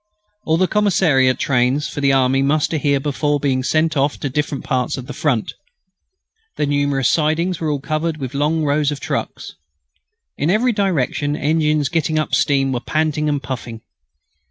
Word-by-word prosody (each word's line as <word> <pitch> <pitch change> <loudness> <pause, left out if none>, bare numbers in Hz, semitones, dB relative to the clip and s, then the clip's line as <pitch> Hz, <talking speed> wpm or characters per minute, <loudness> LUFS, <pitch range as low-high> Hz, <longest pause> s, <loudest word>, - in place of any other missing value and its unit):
All 160 0 +2
the 185 +1 +2
commissariat 170 -12 +2
trains 130 +2 +1
for 145 - -6
the 140 -1 +3
army 135 0 +2
muster 150 +3 +1
here 140 -1 +1
before 145 +1 -1
being 135 -2 0
sent 155 +4 +1
off 140 +1 +1
to 140 - -2
different 145 0 -2
parts 125 0 -1
of 130 - -7
the - - -7
Front. 130 -8 -1 1.0
The - - +1
numerous 145 -2 +1
sidings 165 +3 +1
were 160 - -1
all 145 -1 -1
covered 155 +3 -2
with 130 -4 -6
long 150 +3 0
rows 145 0 +1
of 145 - -5
trucks. - - -4 0.9
In 150 - +1
every 225 +6 +2
direction 155 - 0
engines 150 -1 +1
getting 160 +1 -1
up 155 - -2
steam 135 -2 +2
were 125 - -1
panting 155 +2 -1
and 145 -1 -1
puffing. 120 -3 -6
145 Hz, 170 wpm, -19 LUFS, 135-155 Hz, 1.0 s, the